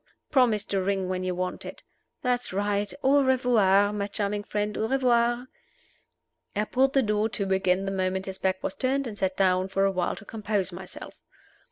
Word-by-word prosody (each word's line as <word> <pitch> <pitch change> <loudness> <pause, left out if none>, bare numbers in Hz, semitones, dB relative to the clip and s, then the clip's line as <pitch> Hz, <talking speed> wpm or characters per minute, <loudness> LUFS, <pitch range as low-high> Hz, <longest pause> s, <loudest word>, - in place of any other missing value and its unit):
Promise 235 -7 +3
to 195 -1 -1
ring 190 -1 -1
when 185 0 -2
you 185 -1 -2
want 185 0 -3
it. - - -9 0.4
That's 250 -1 0
right! 205 +1 -1
Au 280 +1 +5
revoir, 215 -6 +3
my 200 -1 -2
charming 205 0 -2
friend 210 0 -2
au 220 - -1
revoir!" 240 -1 +2 1.1
I 210 - +1
pulled 265 +4 +2
the 270 - +3
door 210 0 +1
to 195 -3 +1
again 190 0 +1
the 195 - -2
moment 190 0 -1
his 190 -1 -7
back 185 0 -1
was - - -2
turned, 270 +1 0
and 225 -4 -6
sat 190 -2 -2
down 185 -1 +2
for 195 0 +1
a 195 - +2
while 185 -2 -1
to 210 - -12
compose 205 -4 -2
myself. 185 +1 -9
205 Hz, 190 wpm, -26 LUFS, 190-235 Hz, 1.1 s, Au